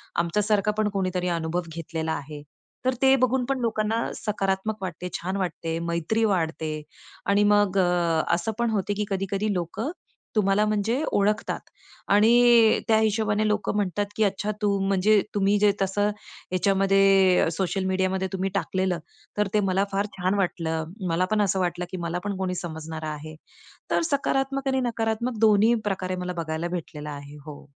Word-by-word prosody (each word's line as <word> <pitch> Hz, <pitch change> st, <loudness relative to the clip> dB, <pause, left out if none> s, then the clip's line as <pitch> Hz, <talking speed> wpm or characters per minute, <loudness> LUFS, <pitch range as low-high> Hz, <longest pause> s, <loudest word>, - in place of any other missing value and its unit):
आमच्यासारखा 205 Hz, +4 st, +1 dB
पण 215 Hz, -1 st, +2 dB
कोणीतरी 185 Hz, -2 st, -1 dB
अनुभव 165 Hz, +2 st, -1 dB
घेतलेला 160 Hz, -1 st, -3 dB
आहे. 145 Hz, 0 st, -7 dB, 0.4 s
तर 255 Hz, -, +3 dB
ते 265 Hz, 0 st, +6 dB
बघून 255 Hz, 0 st, +1 dB
पण 270 Hz, 0 st, -1 dB
लोकांना 220 Hz, -2 st, 0 dB, 0.2 s
सकारात्मक 195 Hz, 0 st, -1 dB
वाटते, 180 Hz, -1 st, -5 dB
छान 185 Hz, +3 st, -3 dB
वाटते, 170 Hz, -3 st, -3 dB
मैत्री 170 Hz, +7 st, 0 dB
वाढते 165 Hz, -5 st, 0 dB, 0.6 s
आणि 200 Hz, +1 st, +4 dB
मग 205 Hz, -2 st, +3 dB, 0.5 s
असं 170 Hz, +6 st, 0 dB
पण 235 Hz, -, +2 dB
होते 205 Hz, -1 st, 0 dB
की 210 Hz, -, 0 dB
कधी-कधी 195 Hz, +2 st, -1 dB
लोकं 180 Hz, -, -3 dB, 0.4 s
तुम्हाला 210 Hz, 0 st, +3 dB
म्हणजे 215 Hz, +5 st, 0 dB
ओळखतात. 210 Hz, +2 st, +1 dB, 0.5 s
आणि 230 Hz, +2 st, +5 dB
त्या 220 Hz, -, +4 dB
हिशोबाने 215 Hz, -1 st, +1 dB
लोकं 210 Hz, 0 st, 0 dB
म्हणतात, 205 Hz, 0 st, 0 dB
की 220 Hz, -, +2 dB
अच्छा 200 Hz, +1 st, 0 dB
तू 200 Hz, -1 st, +2 dB
म्हणजे 200 Hz, +2 st, +4 dB
तुम्ही 200 Hz, 0 st, +3 dB
जे 205 Hz, -1 st, +5 dB
तसं 205 Hz, +2 st, +1 dB
ह्याच्यामध्ये 195 Hz, -1 st, +2 dB
सोशल 190 Hz, +2 st, -1 dB
मीडियामध्ये 190 Hz, 0 st, 0 dB
तुम्ही 190 Hz, +1 st, -1 dB
टाकलेलं, 185 Hz, -3 st, 0 dB, 0.4 s
तर 210 Hz, -, +2 dB
ते 210 Hz, -, +4 dB
मला 195 Hz, +2 st, +2 dB
फार 200 Hz, +1 st, 0 dB
छान 185 Hz, +2 st, 0 dB
वाटलं. 160 Hz, -3 st, -1 dB, 0.3 s
मला 170 Hz, +2 st, +2 dB
पण 215 Hz, -, +3 dB
असं 195 Hz, -1 st, +1 dB
वाटलं 180 Hz, 0 st, -1 dB
की 185 Hz, -, -4 dB
मला 170 Hz, +2 st, -2 dB
पण 200 Hz, -2 st, -2 dB
कोणी 185 Hz, -1 st, -2 dB
समजणारं 160 Hz, -2 st, -6 dB
आहे. 155 Hz, +1 st, -6 dB, 0.6 s
तर -, -, +3 dB
सकारात्मक 275 Hz, 0 st, 0 dB
आणि 265 Hz, 0 st, +1 dB
नकारात्मक 230 Hz, 0 st, -1 dB
दोन्हीप्रकारे 210 Hz, -3 st, +2 dB
मला 180 Hz, 0 st, -4 dB
बघायला 160 Hz, +2 st, -3 dB
भेटलेलं 155 Hz, -4 st, -6 dB
आहे 145 Hz, 0 st, -8 dB
हो. 150 Hz, -2 st, -9 dB
195 Hz, 155 wpm, -25 LUFS, 180-215 Hz, 0.6 s, ते